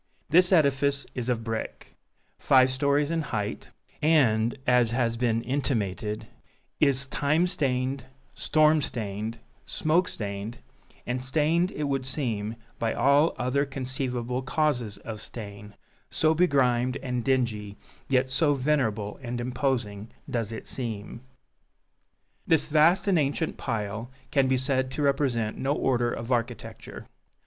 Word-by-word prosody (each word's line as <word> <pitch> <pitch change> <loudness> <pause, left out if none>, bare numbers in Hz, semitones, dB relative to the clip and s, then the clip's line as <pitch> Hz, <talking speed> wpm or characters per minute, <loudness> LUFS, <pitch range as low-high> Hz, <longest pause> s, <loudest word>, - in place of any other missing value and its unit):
This 180 +2 +6
edifice 140 -4 +3
is 125 -1 -3
of 115 -2 0
brick, 115 -1 -5 0.5
five 130 -1 +5
stories 140 +3 +1
in 165 -1 0
height, 105 -8 -4 0.3
and, 120 -8 +3
as 125 -2 +4
has 115 -1 0
been 115 -1 0
intimated, 110 -6 -1 0.5
is 140 -2 +4
time 150 +5 +1
stained, 130 -6 -1 0.3
storm 155 0 +3
stained, 110 -2 -4 0.3
smoke 170 +4 +1
stained 100 +2 -5 0.5
and 125 +1 -2
stained, 160 +6 +1
it 150 - -3
would 135 -2 -1
seem, 115 -6 -2 0.2
by 115 -1 0
all 145 +4 +4
other 130 +3 +1
conceivable 130 -2 -3
causes 130 -7 -1
of 110 +1 -7
stain, 105 -2 -7 0.3
so 155 0 +2
begrimed 130 -6 +2
and 125 -2 -2
dingy, 110 -6 -1 0.3
yet 130 -1 +2
so 145 +2 +3
venerable 125 -7 0
and 120 -1 -4
imposing, 120 -4 -2 0.2
does 115 -3 -2
it 110 - -7
seem. 115 -2 -2 1.3
This 160 -2 +3
vast 165 +6 +4
and 185 -4 +4
ancient 145 +3 -1
pile 110 -1 -3 0.2
can 135 -2 +3
be 130 0 +2
said 130 0 0
to 150 - -2
represent 135 -6 0
no 135 +2 +1
order 120 -4 +1
of 120 +2 -5
architecture. 120 -1 -3
130 Hz, 130 wpm, -27 LUFS, 115-140 Hz, 1.3 s, This